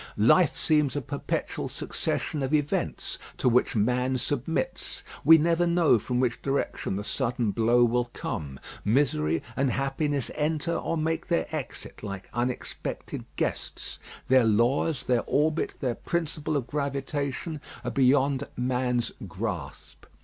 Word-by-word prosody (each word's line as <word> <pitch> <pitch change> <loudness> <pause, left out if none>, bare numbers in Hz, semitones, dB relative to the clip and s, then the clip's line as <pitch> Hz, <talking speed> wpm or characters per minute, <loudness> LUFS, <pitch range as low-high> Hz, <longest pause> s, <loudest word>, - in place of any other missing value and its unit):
Life 125 - +5
seems 150 -3 +2
a - - +1
perpetual 140 +3 -3
succession 150 - -2
of 135 +3 +1
events, 150 -1 -1 0.2
to - - +1
which 125 0 +3
man 125 +4 +2
submits. 145 - -2 0.2
We 165 - +9
never 170 +2 +2
know 170 -8 +4
from 125 +3 -1
which 125 -2 0
direction 135 -7 -1
the 100 - -3
sudden 120 -2 0
blow 115 +4 +4
will 120 +1 +2
come. 70 - -5 0.2
Misery 90 - +2
and 135 0 +2
happiness 135 +2 -1
enter 155 +2 0
or 165 - -1
make 160 +1 -1
their 170 - +1
exit, 145 -6 -6
like 100 -2 -6
unexpected 120 +1 -3
guests. - - -3 0.3
Their 130 -1 +6
laws, 120 +7 +2
their 125 -2 +2
orbit, 155 +2 +1
their 125 -4 +1
principle 155 0 -2
of 130 - -2
gravitation, 140 +2 -2 0.2
are - - -2
beyond 135 +1 +3
man's 125 -1 0 0.2
grasp. 90 -7 -6
130 Hz, 135 wpm, -27 LUFS, 120-150 Hz, 0.3 s, We